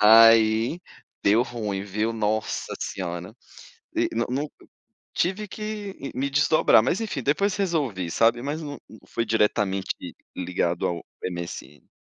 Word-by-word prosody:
Aí, 115 +5 +6 0.4
deu 110 +4 +5
ruim, 105 -6 -3
viu, 105 +3 -1
Nossa 110 0 -1
Senhora. 90 -2 -4 0.6
De - - +1
no 115 +1 0
no 145 +4 -2 0.6
tive 195 +4 0
que, 210 -1 -5
ih, 140 - -6
me 135 +2 -1
desdobrar, 145 -4 +5
mas, 170 - +1
enfim, 200 - -3
depois 190 - +2
resolvi, 140 - -1
sabe. 115 +4 +3
Mas 145 +5 -3
não 145 -2 -6
não 110 - -13
foi 115 - -2
diretamente 105 -3 +1 0.4
ligado 90 -1 -1
ao 85 -1 -1 0.2
MSN. 85 -5 -6
115 Hz, 135 wpm, -25 LUFS, 100-145 Hz, 0.6 s, Aí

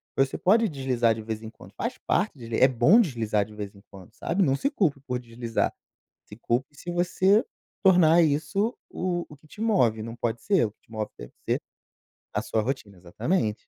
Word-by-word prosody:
você 135 0 +1
pode 220 +4 +3
deslizar 125 -6 +1
de 110 - -6
vez 110 0 -4
em 110 - -7
quando. - - -15
Faz - - -4
parte - - +1
de 115 -1 -5
é 130 - +7
bom 130 - +5
deslizar 115 - 0
de 105 +1 -14
vez 105 -2 -6
em 100 - -17
quando, 95 -3 -14
sabe. 190 +4 0
Não 135 -5 +3
se 275 - 0
culpe 175 - +1
por 125 -1 -1
deslizar. 115 -1 -2 0.5
Se 105 - -12
culpe 120 +5 -2
se 175 - -7
você 185 +4 +3 0.4
tornar 175 -3 +6
isso 195 - +1 0.2
o 175 -1 -2
o 150 - -13
que 150 - -23
te 205 - -13
move. 150 - +2
Não 115 +1 -6
pode 120 -1 -2
ser. 195 - +3
O - - -6
que - - -49
te - - -31
move 110 -1 -3
deve - - -10 0.2
ser - - +1 0.7
a - - 0
sua 110 - 0
rotina. 105 -5 -4
Exatamente. 105 - -2
130 Hz, 205 wpm, -26 LUFS, 110-175 Hz, 0.7 s, é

